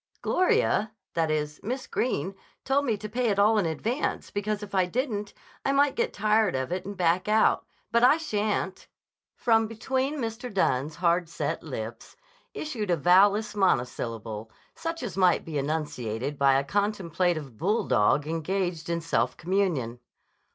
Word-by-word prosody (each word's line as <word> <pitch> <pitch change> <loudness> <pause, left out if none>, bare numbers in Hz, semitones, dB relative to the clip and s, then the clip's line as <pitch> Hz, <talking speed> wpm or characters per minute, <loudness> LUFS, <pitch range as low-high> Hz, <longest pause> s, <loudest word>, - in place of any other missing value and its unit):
"Gloria—that 215 - +1
is 150 -1 -2
Miss 255 +4 -3
Greene 195 - -1 0.3
told 280 +2 +2
me 225 -5 0
to 215 - -6
pay 240 +2 0
it 200 - 0
all 210 +2 +4
in 185 - +1
advance 225 - -2
because 205 0 -2
if 205 - -9
I 185 -2 +3
didn't 210 -2 -2 0.3
I 275 - +1
might 280 0 +3
get - - 0
tired 215 -3 +2
of 130 +4 -2
it 180 +1 -2
and 200 -1 -6
back 175 +2 +2
out. 215 +1 +3 0.2
But 235 +1 +3
I 255 +5 +7
shan't." 210 - -2 0.5
From 225 -2 +3
between 260 +6 -1
Mr. 240 0 -4
Dunne's 150 -6 +1
hard 170 0 +1
set - - -3
lips - - -7 0.4
issued 235 -10 -4
a 175 - +3
vowel 185 +6 +6
less 210 0 -3
monosyllable 115 - -1 0.2
such 330 -3 -4
as 195 -7 -5
might 185 -2 +3
be 155 -3 -2
enunciated 140 -3 -3
by 135 -1 +5
a 135 - +1
contemplative 175 - -1
bulldog 145 - +2
engaged 170 +1 -2
in 170 0 -1
self 125 -7 0
communion. 165 -10 -1
195 Hz, 155 wpm, -27 LUFS, 155-220 Hz, 0.5 s, I